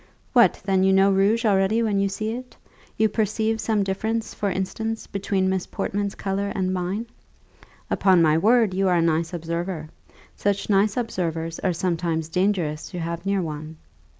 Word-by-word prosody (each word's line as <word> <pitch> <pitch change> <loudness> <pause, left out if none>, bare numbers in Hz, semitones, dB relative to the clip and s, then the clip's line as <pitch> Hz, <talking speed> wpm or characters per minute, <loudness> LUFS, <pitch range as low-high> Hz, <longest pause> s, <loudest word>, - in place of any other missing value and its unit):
"What, 235 -8 +5
then 190 -1 +2
you 190 - +4
know 195 +1 +5
rouge 205 +5 +2
already 205 +2 +3
when 205 -3 +1
you 200 0 +1
see 215 +3 -3
it? 250 +1 -8 0.4
You 220 - +4
perceive 220 +1 0
some 215 -3 +1
difference, 220 +4 -2
for 205 - -1
instance, 220 +4 -3
between 195 -1 -1
Miss 190 -1 -1
Portman's 200 0 -3
colour 200 +1 -2
and 185 -1 0
mine? 185 +5 -2 0.9
Upon 190 -2 +4
my 155 -2 +4
word, 220 +3 +3
you 195 +1 +1
are 180 - +3
a - - +3
nice 165 0 +1
observer. 170 -1 -4 0.5
Such 200 +1 -1
nice 200 +2 +3
observers 165 -8 -2
are 185 - 0
sometimes 165 -2 -1
dangerous 175 -4 0
to 180 - -7
have 170 +2 -4
near 195 -2 +1
one." 155 0 -6
190 Hz, 170 wpm, -24 LUFS, 170-210 Hz, 0.9 s, What